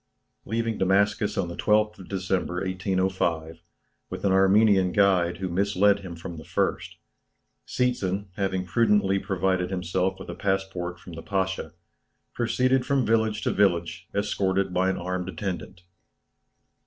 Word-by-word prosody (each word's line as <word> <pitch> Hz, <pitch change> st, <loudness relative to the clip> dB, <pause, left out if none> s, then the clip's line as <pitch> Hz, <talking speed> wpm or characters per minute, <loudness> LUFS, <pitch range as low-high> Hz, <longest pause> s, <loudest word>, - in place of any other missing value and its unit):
Leaving 115 Hz, +1 st, -2 dB
Damascus 100 Hz, +2 st, +2 dB
on 95 Hz, -, 0 dB
the 85 Hz, -, -6 dB
12th 105 Hz, +1 st, +1 dB
of 95 Hz, -, -12 dB
December, 95 Hz, -2 st, -1 dB
1805, 95 Hz, -4 st, -1 dB, 0.5 s
with -, -, -5 dB
an 100 Hz, -, +3 dB
Armenian 95 Hz, 0 st, +4 dB
guide 90 Hz, -4 st, +3 dB
who 95 Hz, +1 st, -3 dB
misled 100 Hz, +2 st, +2 dB
him 90 Hz, -3 st, -8 dB
from 85 Hz, 0 st, -8 dB
the 80 Hz, -, -9 dB
first, -, -, -2 dB, 0.7 s
Seetzen, 100 Hz, -6 st, -1 dB
having 95 Hz, -2 st, -1 dB
prudently 100 Hz, -1 st, +2 dB
provided 95 Hz, -2 st, 0 dB
himself 95 Hz, 0 st, -1 dB
with -, -, -9 dB
a -, -, -4 dB
passport 95 Hz, -3 st, -2 dB
from 90 Hz, -, -11 dB
the 80 Hz, -, -7 dB
Pasha, 95 Hz, -5 st, -2 dB, 0.6 s
proceeded 130 Hz, +2 st, +1 dB
from 135 Hz, -2 st, +1 dB
village 110 Hz, -1 st, +1 dB
to -, -, +1 dB
village 90 Hz, -3 st, +1 dB
escorted 95 Hz, -2 st, 0 dB
by 95 Hz, +1 st, +2 dB
an 95 Hz, -, -1 dB
armed 90 Hz, +1 st, -3 dB
attendant. 90 Hz, 0 st, -5 dB
95 Hz, 140 wpm, -26 LUFS, 90-100 Hz, 0.7 s, Armenian